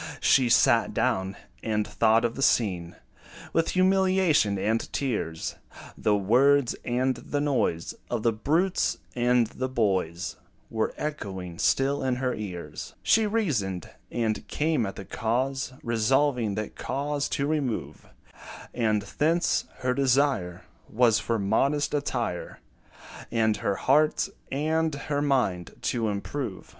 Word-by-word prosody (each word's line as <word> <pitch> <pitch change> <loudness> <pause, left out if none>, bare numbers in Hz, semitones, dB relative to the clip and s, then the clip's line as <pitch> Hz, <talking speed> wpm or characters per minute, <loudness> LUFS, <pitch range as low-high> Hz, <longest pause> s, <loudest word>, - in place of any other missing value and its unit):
She 130 -3 +4
sat 120 - +4
down, 95 +1 0 0.3
and 105 -2 0
thought 115 +1 +3
of 115 - 0
the 135 - -6
scene 90 -10 +1 0.6
With 165 0 +2
humiliation 185 - +3
and 110 +4 -1
tears: 105 - -2 0.4
The 105 - +1
words, 125 +6 +3
and 125 +1 0
the 145 - -3
noise 135 - 0 0.2
Of 120 -3 -2
the 115 - +3
brutes 160 - +1 0.2
and 120 -1 +3
the 130 +4 -4
boys 95 -8 -1 0.3
Were 110 -1 -1
echoing 95 - -5
still 135 +1 +2
in 130 -1 +1
her 125 0 -1
ears. 90 -8 -7
She 220 -1 +4
reasoned, 125 - -1 0.2
and 110 -2 -2
came 150 -7 0
at 95 - -6
the 95 - -8
cause, 130 +7 -1
Resolving 120 -1 +1
that 110 0 -4
cause 145 +1 -2
to 140 - 0
remove; 145 -6 -2 0.7
And 110 -3 +1
thence, 160 - +1 0.2
her 125 0 +1
desire 130 -9 +1 0.3
Was 115 -1 +3
for 115 - -1
modest 135 +10 +1
attire, 120 -10 -2 0.7
And 110 -2 +2
her 100 -1 -1
heart 150 +8 +2 0.2
and 155 +2 0
her 145 +1 -2
mind 125 - 0 0.2
to 115 -3 0
improve. 105 +1 -4
120 Hz, 130 wpm, -27 LUFS, 105-145 Hz, 0.7 s, She